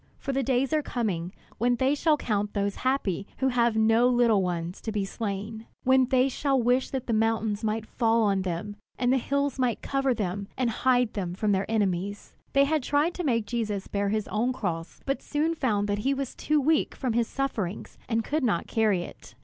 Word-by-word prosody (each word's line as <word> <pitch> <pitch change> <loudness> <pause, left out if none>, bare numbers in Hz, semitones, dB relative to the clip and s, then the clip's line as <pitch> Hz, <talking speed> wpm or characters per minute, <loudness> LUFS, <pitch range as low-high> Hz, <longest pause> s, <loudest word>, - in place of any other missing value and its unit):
For 275 - -4
the 270 - +1
days 265 +2 +1
are 310 - +3
coming 195 - -2 0.3
when 245 +2 +3
they 260 +3 +2
shall 305 +1 +2
count 210 -5 -2
those 200 0 -1
happy 235 -8 -1
who 265 - +1
have 235 -3 +2
no 225 +2 +4
little 240 -5 +4
ones 175 0 -3
to 220 - -4
be 205 -2 -1
slain; 215 +2 -5 0.2
when 260 0 +5
they 260 0 +3
shall 275 0 0
wish 250 +2 +2
that 265 -2 -3
the 235 - -1
mountain 220 -1 +1
might 220 0 -1
fall 230 0 +2
on 200 -2 +2
them, 190 +3 -4 0.2
and 250 0 +2
the - - +4
hills 280 +1 -1
might 250 -3 0
cover 270 -2 +1
them, 200 -1 -3
and 250 -3 +1
hide 250 -1 +2
them 180 -4 -3
from 210 +2 0
their 195 +1 0
enemies!" 200 -2 -1 0.2
They 275 - +5
had 310 +1 +1
tried 290 +6 +1
to 360 - -4
make 230 -7 +1
Jesus 210 -3 -2
bear 200 0 -1
his 215 0 -1
own 240 +4 0
cross, 165 -8 -4
but 275 0 -1
soon 310 +3 0
found 215 -10 0
that 205 0 -1
he 270 +6 +1
was 270 -1 -4
too 305 0 +1
weak 305 +3 +1
from 255 -4 -2
his 235 0 +1
sufferings, 220 -9 -3
and 225 -1 +1
could 300 +5 -1
not 205 -9 +1
carry 210 -5 +1
it. 145 - -12
230 Hz, 210 wpm, -27 LUFS, 205-265 Hz, 0.3 s, when